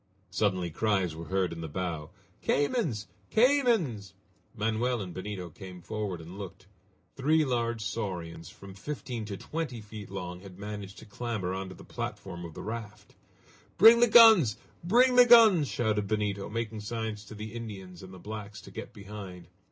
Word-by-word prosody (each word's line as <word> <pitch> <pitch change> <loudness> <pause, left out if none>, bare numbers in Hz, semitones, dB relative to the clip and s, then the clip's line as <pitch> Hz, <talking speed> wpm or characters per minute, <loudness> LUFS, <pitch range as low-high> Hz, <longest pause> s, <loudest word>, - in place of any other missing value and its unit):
Suddenly 90 -3 0
cries 95 -3 0
were 85 +1 -7
heard 95 0 0
in 85 - -7
the 80 - -4
bow. 80 -1 -4 0.3
"Caymans! 145 - 0 0.2
caymans!" 220 - +2 0.4
Manoel 115 +3 0
and 95 -4 -6
Benito 95 -2 -6
came 90 +1 -10
forward 100 0 -4
and 85 +5 -10
looked. 95 -2 -8 0.5
Three 155 +3 +3
large 115 -3 -1
saurians, 90 -7 -4
from 100 -1 -12
fifteen 120 +1 -5
to 100 -2 -5
twenty 155 -4 -4
feet 105 -1 -9
long, 90 -2 -6
had 95 -1 -12
managed 100 -1 -7
to - - -11
clamber 105 -4 -3
on 95 0 -4
to 95 - -10
the - - -13
platform 85 -3 -6
of 80 - -10
the - - -7
raft. 105 -1 -7 0.6
"Bring 225 +4 +9
the 240 - +6
guns! 220 - +8 0.3
Bring 245 +7 +4
the 245 - +10
guns!" 220 -10 +8
shouted 105 -5 0
Benito, 105 -1 -1
making 110 0 -3
signs 110 -1 -4
to 110 - -10
the 105 +1 -7
Indians 95 -6 -8
and 95 0 -11
the 95 - -10
blacks 105 +1 -7
to - - -13
get - - -8
behind. 100 -4 -9
105 Hz, 165 wpm, -29 LUFS, 95-120 Hz, 0.6 s, the